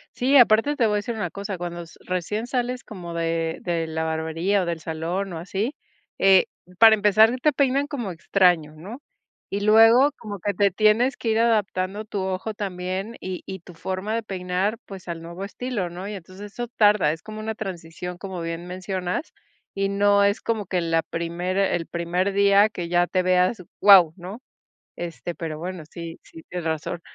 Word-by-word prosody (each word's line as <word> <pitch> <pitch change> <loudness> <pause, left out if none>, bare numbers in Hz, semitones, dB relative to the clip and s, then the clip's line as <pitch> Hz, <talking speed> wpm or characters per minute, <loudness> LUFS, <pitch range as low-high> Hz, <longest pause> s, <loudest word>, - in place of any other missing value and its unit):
Sí, 270 +3 +4
aparte, 235 +4 +5
te 245 - +2
voy 210 - +1
a - - +2
decir 215 +3 -3
una 215 - -3
cosa, 200 -1 -5
cuando 175 0 -5
s 165 -1 -13
recién 185 +5 -2
sales 250 0 -2
como 175 -5 -8
de 165 -1 -1
de 170 -2 -1
la 160 0 -2
barbería, 160 +5 0
o - - -1
del 170 -1 -2
salón 170 +4 -3
o 165 - -5
así, 195 - -3 0.4
eh, 195 -1 +6 0.3
para 225 +1 +8
empezar 215 +2 +5
te 300 - +4
peinan 280 +1 +1
como 240 -10 -4
extraño, 170 -3 +2
¿no? 205 - -9 0.5
Y 200 +1 -3
luego 225 +6 +6
como 205 -3 -6
que 205 +3 -1
te 200 -1 +3
tienes 215 +7 +3
que 230 - -3
ir 220 0 +2
adaptando 210 -3 0
tu 205 -1 -4
ojo 190 +3 -3
también, 190 +2 -4
y 185 -1 -5
y 190 -2 -6
tu 180 - -13
forma 185 +5 -4
de 230 - 0
peinar, 190 +1 -2
pues, 190 -3 -10
al 165 -1 -5
nuevo 170 +3 -7
estilo, 210 -3 -4
¿no? 180 +3 -7
Y 210 - -5
entonces 195 +2 -10
eso 240 0 -4
tarda. 210 -8 +3
Es 160 - -7
como 215 0 -8
una 220 +1 -4
transición, 180 -3 -6
como 190 -2 -6
bien 165 +1 -5
mencionas. 185 - -4 0.4
Y 195 0 0
no 200 0 +3
es 200 +1 +2
como 220 -4 -2
que 185 -1 0
la 165 -1 +1
primera 175 +4 -1
el 165 -2 -3
primer 175 +3 -1
día 200 +1 +5
que 175 -5 -5
ya 175 0 +2
te 185 0 0
veas, 185 +2 +2 0.2
guau, 190 -6 +8
¿no? 195 +7 -9 0.5
Este, 175 0 -5
pero 160 -2 -5
bueno, 175 0 -6
sí 170 -1 -8
sí, 160 - -14
tienes 175 -1 -5
razón. 160 +2 -3
190 Hz, 190 wpm, -24 LUFS, 175-215 Hz, 0.5 s, para